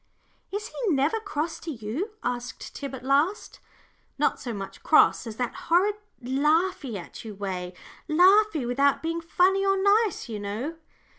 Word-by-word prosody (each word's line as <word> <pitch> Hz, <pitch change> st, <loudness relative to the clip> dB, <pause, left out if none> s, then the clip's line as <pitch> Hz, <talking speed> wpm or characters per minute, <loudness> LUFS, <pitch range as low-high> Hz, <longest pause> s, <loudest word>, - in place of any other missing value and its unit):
"Is 420 Hz, +2 st, -4 dB
he 455 Hz, -6 st, -2 dB
never 290 Hz, +11 st, +1 dB
cross 330 Hz, -6 st, -3 dB
to 330 Hz, -, -8 dB
you?" 255 Hz, -, -4 dB
asked 245 Hz, 0 st, -4 dB
Tib; 275 Hz, -1 st, -5 dB
"at 255 Hz, 0 st, -10 dB
least, 290 Hz, +9 st, +1 dB, 0.6 s
not -, -, +1 dB
so 245 Hz, -, -5 dB
much 195 Hz, -3 st, -7 dB
cross -, -, +4 dB
as 220 Hz, -, -6 dB
that 245 Hz, 0 st, -2 dB, 0.2 s
horrid 370 Hz, +5 st, +4 dB, 0.3 s
laughy 280 Hz, -, +1 dB
at 175 Hz, -, -9 dB
you 215 Hz, -2 st, -8 dB
way 185 Hz, -2 st, -4 dB, 0.3 s
laughy 365 Hz, -, +5 dB
without 275 Hz, +5 st, +2 dB
being 330 Hz, +1 st, -2 dB
funny 370 Hz, +4 st, +2 dB
or 390 Hz, 0 st, +3 dB
nice, 405 Hz, -1 st, +2 dB
you 220 Hz, -3 st, -5 dB
know." 215 Hz, +11 st, -4 dB
290 Hz, 155 wpm, -26 LUFS, 240-380 Hz, 0.6 s, laughy